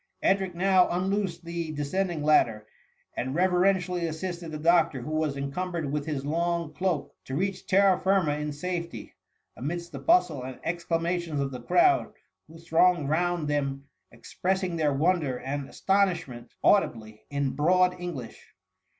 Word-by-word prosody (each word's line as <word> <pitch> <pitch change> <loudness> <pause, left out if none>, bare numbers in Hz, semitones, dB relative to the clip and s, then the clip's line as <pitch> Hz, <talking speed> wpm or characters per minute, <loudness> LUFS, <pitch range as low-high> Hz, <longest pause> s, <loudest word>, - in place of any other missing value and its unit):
Edric 190 -2 +1
now 185 0 +4
unloosed 190 0 -1
the 170 -2 -4
descending 160 +2 -2
ladder, 115 -8 +3 0.5
and 130 +3 -3
reverentially 180 -1 +2
assisted 170 +1 -5
the 155 - -4
doctor, 165 -3 +3
who 130 - -6
was 155 -3 -1
encumbered 155 +2 -3
with 150 0 -2
his 140 -3 -3
long 170 +1 -1
cloak, 180 -3 -2
to 130 - -5
reach 190 +2 -2
terra 195 -2 +4
firma 190 -5 +2
in 150 0 -3
safety, 170 +3 -5 0.2
— - - -49
amidst 170 +6 -4
the - - -7
bustle 325 - +3
and 130 0 -7
exclamations 170 -1 -1
of 140 -1 -1
the 125 -2 -7
crowd, 350 - +3 0.4
who 165 - -13
thronged 165 -2 +2
round 175 0 0
them 140 -2 -2 0.3
expressing 180 +9 -2
their 155 -3 +1
wonder 150 -2 +1
and 140 +1 -4
astonishment 180 -12 0
audibly, 110 - +2
in 140 -2 -1
broad 180 +4 +3
English. 135 - -7
170 Hz, 145 wpm, -27 LUFS, 145-180 Hz, 0.5 s, now